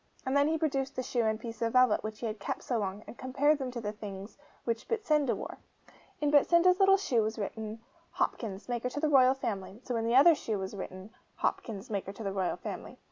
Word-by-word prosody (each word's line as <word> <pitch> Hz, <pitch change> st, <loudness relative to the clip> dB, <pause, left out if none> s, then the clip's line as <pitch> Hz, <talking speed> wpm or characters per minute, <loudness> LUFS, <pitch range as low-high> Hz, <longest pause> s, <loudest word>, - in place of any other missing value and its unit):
And 260 Hz, +1 st, 0 dB
then 285 Hz, +1 st, +4 dB
he 320 Hz, +1 st, +1 dB
produced 275 Hz, -4 st, -1 dB
the 255 Hz, -, -2 dB
shoe 240 Hz, -2 st, 0 dB
and 220 Hz, 0 st, 0 dB
piece 230 Hz, 0 st, -8 dB
of 230 Hz, -1 st, 0 dB
velvet 255 Hz, -4 st, +4 dB
which 215 Hz, 0 st, -6 dB
he -, -, -2 dB
had 215 Hz, -1 st, -3 dB
kept 200 Hz, -, -4 dB
so 240 Hz, -3 st, -1 dB
long, 200 Hz, +1 st, -3 dB
and -, -, -11 dB
compared 285 Hz, +4 st, +2 dB
them 265 Hz, -2 st, -3 dB
with 240 Hz, -2 st, -6 dB
the 210 Hz, -, -2 dB
things 205 Hz, -1 st, -8 dB, 0.3 s
which 230 Hz, 0 st, -2 dB
Betsinda 305 Hz, -, +1 dB
wore. -, -, -7 dB, 0.6 s
In 295 Hz, -1 st, +1 dB
Betsinda's 340 Hz, +5 st, +5 dB
little 390 Hz, 0 st, +6 dB
shoe 255 Hz, -, +1 dB
was 220 Hz, +1 st, -2 dB
written, 220 Hz, +1 st, -5 dB, 0.3 s
'Hopkins, 205 Hz, -3 st, -2 dB
maker 245 Hz, 0 st, -2 dB
to 280 Hz, -, -4 dB
the 310 Hz, 0 st, +1 dB
Royal 260 Hz, -2 st, +6 dB
Family'; 205 Hz, -5 st, -4 dB
so 245 Hz, -, -3 dB
in 225 Hz, -, -1 dB
the 235 Hz, -, +2 dB
other 290 Hz, +6 st, +8 dB
shoe 225 Hz, -8 st, -2 dB
was 190 Hz, +1 st, -5 dB
written, 190 Hz, +1 st, -7 dB, 0.2 s
'Hopkins, 220 Hz, +1 st, -3 dB
maker 195 Hz, -1 st, -3 dB
to 220 Hz, -, -8 dB
the 195 Hz, -1 st, -2 dB
Royal 190 Hz, -2 st, -1 dB
Family. -, -, -7 dB
235 Hz, 230 wpm, -30 LUFS, 215-275 Hz, 0.6 s, other